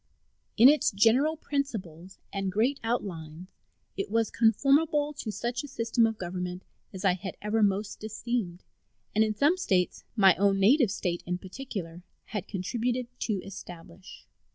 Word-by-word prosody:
In 230 +3 +9
its 295 +2 +5
general 245 +10 +3
principles 200 - -4 0.2
and 195 -1 -2
great 240 +8 +1
outlines 180 -7 -4 0.5
it 195 - -3
was 225 +1 +1
conformable 290 +6 +3
to 235 -6 -5
such 240 +4 -3
a - - -7
system 230 -2 +1
of 225 -1 -4
government 180 0 -5 0.3
as 190 -1 -6
I 190 - +5
had 190 +1 -6
ever 210 +2 0
most 205 +1 0
esteemed, 215 -4 -3 0.5
and 215 - +4
in 215 -1 -1
some 295 - +3
States, 185 - 0
my 195 -4 +6
own 195 0 +3
native 240 +4 +5
State 175 -2 -2
in 180 0 -1
particular, 185 -4 -7 0.2
had 210 -4 -5
contributed 240 +6 -2
to 205 -5 -2
establish. 180 -1 -11
210 Hz, 150 wpm, -28 LUFS, 185-245 Hz, 0.5 s, In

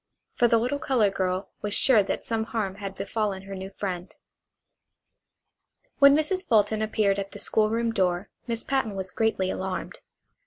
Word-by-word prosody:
For 240 - +3
the 230 - +4
little 250 +5 -1
colored 245 -10 +2
girl 190 0 -2
was 210 0 -1
sure 245 -6 +6
that 195 - -3
some 225 -1 -1
harm 220 -4 -2
had 195 -1 -6
befallen 200 -1 -2
her 195 0 -8
new 190 0 -6
friend. 185 -2 -5 1.9
When 280 0 +8
Mrs. 370 +5 0
Fulton 215 -1 +2
appeared 215 -2 +1
at 195 0 -5
the - - -8
school 215 -1 +2
room 230 +1 0
door 185 -1 0 0.2
Miss 230 -1 -2
Patten 265 -7 -1
was 190 -1 -3
greatly 220 -4 0
alarmed. 190 -1 -4
210 Hz, 165 wpm, -26 LUFS, 195-230 Hz, 1.9 s, When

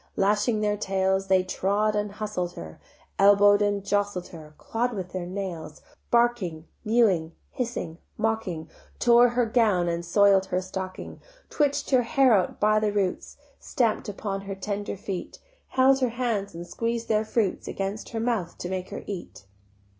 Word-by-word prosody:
Lashing 210 +3 +2
their 210 -1 +1
tails 190 -1 0
They 190 -1 +4
trod 205 +3 0
and 210 -1 -2
hustled 205 -5 -3
her, 80 -1 -9 0.4
Elbow'd 205 +1 +6
and 205 -1 0
jostled 205 -2 -1
her, 155 -2 -12
Claw'd 240 +2 -2
with 185 -4 -5
their 180 -1 -4
nails, 180 -5 -6 0.3
Barking, 235 -10 +1 0.2
mewing, 210 -8 +2 0.2
hissing, 225 -10 -4 0.2
mocking, 215 -8 -2 0.3
Tore 240 0 +6
her 240 0 +1
gown 215 -6 +2
and 170 0 -1
soil'd 195 +2 +4
her 180 - 0
stocking, 185 0 -6 0.3
Twitch'd 285 -2 0
her 255 -2 +5
hair 255 +1 +3
out 185 -4 +1
by 215 +1 +4
the 215 -1 0
roots, 200 -3 -2 0.2
Stamp'd 230 -4 0
upon 195 -1 -4
her 195 0 -6
tender 200 +1 -4
feet, 190 -2 -6 0.3
Held 265 +1 +4
her 255 -2 +1
hands 230 -6 -2
and 170 +1 -6
squeez'd 230 +4 -3
their 215 -1 +2
fruits 215 -3 -1
Against 195 +2 -4
her 225 - -4
mouth 225 -7 -1
to 175 - -5
make 185 -1 -4
her - - -7
eat. 170 - -7
205 Hz, 160 wpm, -26 LUFS, 185-225 Hz, 0.4 s, Elbow'd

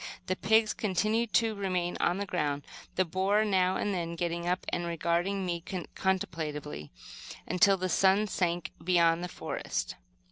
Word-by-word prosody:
The 185 - 0
pigs 220 +2 +3
continued 215 +3 0
to 225 -1 +3
remain 185 -3 -1
on 175 - +2
guard, 150 -7 -1 0.3
the 185 - +2
boar 195 +5 +2
now 190 -2 +2
and 205 - -1
then 170 -2 -3
getting 170 0 -2
up 180 +1 0
and 175 -1 -2
regarding 170 +3 0
me 170 -1 -2 0.3
contemplatively, 155 - -2 0.5
until 195 +3 +4
the 185 0 -1
sun 195 +3 +4
sank 175 -4 -1
behind 170 -1 +3
the - - -2
forest. - - -4
180 Hz, 145 wpm, -30 LUFS, 170-195 Hz, 0.5 s, until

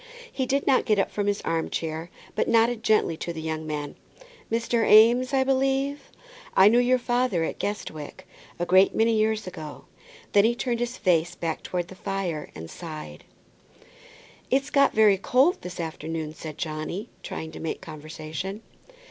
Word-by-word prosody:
He 260 -2 -2
did 275 +2 0
not 265 - +3
get 215 -3 +2
up 195 - +1
from 205 -1 -2
his 205 0 0
arm 165 -1 -1
chair, 160 +1 -4 0.2
but - - 0
nodded 230 0 +3
gently 215 -6 +3
at 160 - -10
the 170 -2 -4
young 160 0 -4
man. 150 -1 -4 0.6
"Mr. 230 0 +1
Eames, 240 +4 +6
I 265 -1 +3
believe? 270 +1 0 0.5
I 195 +2 +8
knew 235 +3 +4
your 250 +1 +4
father 240 -7 0
at - - -4
Guestwick, 160 -7 -5 0.3
a 175 - -1
great 185 +2 +5
many 225 0 +3
years 220 0 +1
ago;" 160 -5 -8 0.5
then 200 - +5
he 235 +2 +3
turned 240 -1 -2
his 240 +1 -2
face 170 -3 +1
back 165 -2 -3
towards 175 -1 -3
the - - -9
fire 185 -5 -3
and 80 +1 -7
sighed. 155 - -9 1.2
"It's 270 +2 +1
got 280 -1 +4
very 210 -3 +5
cold 265 - +3
this 180 0 -8
afternoon," 160 -1 -4
said 155 -1 -8
Johnny, 160 +7 -4
trying 160 0 -6
to - - -9
make 160 - -3
conversation. 160 +5 -7
195 Hz, 170 wpm, -26 LUFS, 160-240 Hz, 1.2 s, I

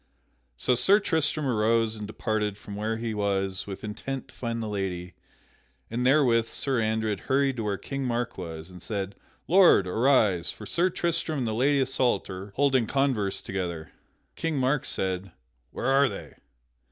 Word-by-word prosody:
So 125 - +2
Sir 160 - +5
Tristram 160 -5 0
arose 115 -2 +2
and 105 -1 -6
departed 105 -1 -2
from 105 0 -9
where 110 +2 -2
he 115 -1 -3
was 95 -2 -1
with 100 0 -7
intent 130 +5 -5
to - - -17
find 115 -1 -3
the - - -3
lady; 95 -3 -3 0.8
and 120 +2 -1
therewith 125 -4 +4
Sir 130 -1 0
Andred 110 -2 0
hurried 135 -1 +2
to 115 - -2
where 100 -1 -1
King 135 -1 -4
Mark 120 -1 -1
was, 80 -1 -7
and 90 -1 -12
said: 100 -1 -3 0.3
"Lord, 175 - +6
arise, 105 -4 +2
for 105 - -10
Sir 175 - +1
Tristram 165 -3 -1
and 125 -4 -1
the 110 - -1
Lady 140 +5 +3
Isoult 130 -4 +1
are 95 +2 -7
holding 135 -4 +3
converse 130 -8 0
together." 85 -5 -4 0.4
King 165 -2 -2
Mark 130 +1 +1
said, 95 -1 -2 0.4
"Where - - -6
are 135 +1 +4
they?" - - -8
115 Hz, 165 wpm, -27 LUFS, 100-135 Hz, 0.8 s, Lord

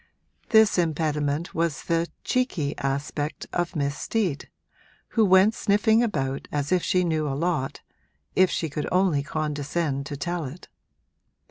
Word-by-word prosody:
This 220 -4 +5
impediment 155 -1 0
was 165 -4 -1
the 170 0 0 0.2
'cheeky' 195 - 0
aspect 140 +2 -3
of 175 0 -1
Miss 140 -1 0
Steet, 190 -9 -2 0.6
who 225 - +2
went 190 +2 +5
sniffing 220 +2 +3
about 140 - -1
as 145 0 -2
if 180 -1 +3
she 180 +1 +2
knew 160 -3 0
a 135 -1 -2
lot, 155 -4 -1 0.5
if 185 -1 +5
she 165 - -1
should 150 0 -4
only 180 -6 +3
condescend 145 -1 -2
to 145 - -5
tell 170 +2 -2
it. 140 +7 -9
160 Hz, 140 wpm, -25 LUFS, 145-185 Hz, 0.6 s, This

